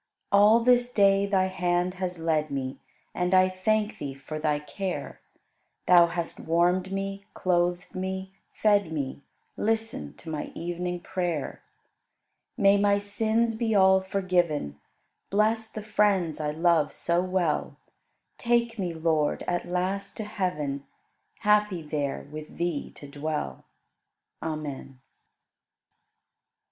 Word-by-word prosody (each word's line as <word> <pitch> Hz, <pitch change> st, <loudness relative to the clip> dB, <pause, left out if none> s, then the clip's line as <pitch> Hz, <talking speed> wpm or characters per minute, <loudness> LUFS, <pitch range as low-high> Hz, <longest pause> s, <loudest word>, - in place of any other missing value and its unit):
All 210 Hz, +3 st, +6 dB
this 245 Hz, 0 st, +3 dB
day 200 Hz, -2 st, +4 dB
Thy 190 Hz, -2 st, +2 dB
hand 180 Hz, -1 st, 0 dB
has 180 Hz, -1 st, -2 dB
led 160 Hz, -2 st, 0 dB
me, 135 Hz, -1 st, -4 dB, 0.3 s
And 180 Hz, +1 st, +1 dB
I 185 Hz, 0 st, +6 dB
thank 210 Hz, +3 st, 0 dB
Thee 140 Hz, -2 st, -5 dB
for 145 Hz, +3 st, -7 dB
Thy 150 Hz, -1 st, +1 dB
care; 180 Hz, +5 st, -5 dB, 0.6 s
Thou 175 Hz, -1 st, +7 dB
hast 170 Hz, -1 st, -4 dB
warmed 180 Hz, +3 st, +1 dB
me, 195 Hz, 0 st, -4 dB
clothed 175 Hz, -1 st, 0 dB
me, 190 Hz, 0 st, -4 dB, 0.2 s
fed 205 Hz, -5 st, +2 dB
me; 140 Hz, -3 st, -3 dB, 0.4 s
Listen 225 Hz, +4 st, -2 dB
to -, -, -16 dB
my 155 Hz, -2 st, -3 dB
evening 175 Hz, +1 st, -3 dB
prayer. 175 Hz, -6 st, -3 dB, 1.0 s
May 200 Hz, 0 st, +5 dB
my 200 Hz, 0 st, +4 dB
sins 220 Hz, +3 st, +1 dB
be 225 Hz, -1 st, 0 dB
all 190 Hz, -1 st, +6 dB
forgiven; 175 Hz, -, 0 dB, 0.5 s
Bless 220 Hz, +2 st, +1 dB
the 215 Hz, -, -7 dB
friends 205 Hz, -6 st, +1 dB
I 150 Hz, -1 st, -1 dB
love 165 Hz, 0 st, +2 dB
so 170 Hz, +1 st, 0 dB
well; 185 Hz, -4 st, -1 dB, 0.6 s
Take 235 Hz, -1 st, +1 dB
me, 175 Hz, -3 st, -2 dB
Lord, 160 Hz, -2 st, +1 dB
at 175 Hz, 0 st, -1 dB
last 190 Hz, +2 st, -2 dB
to 220 Hz, -, -3 dB
heaven. 180 Hz, -10 st, -2 dB, 0.6 s
Happy 210 Hz, -5 st, +2 dB
there 145 Hz, -3 st, -3 dB
with 155 Hz, 0 st, -9 dB
Thee 170 Hz, -4 st, -2 dB
to 145 Hz, -, -11 dB
dwell. 145 Hz, -, -4 dB, 0.8 s
Amen. 150 Hz, -4 st, -5 dB
180 Hz, 125 wpm, -27 LUFS, 160-200 Hz, 1.0 s, Thou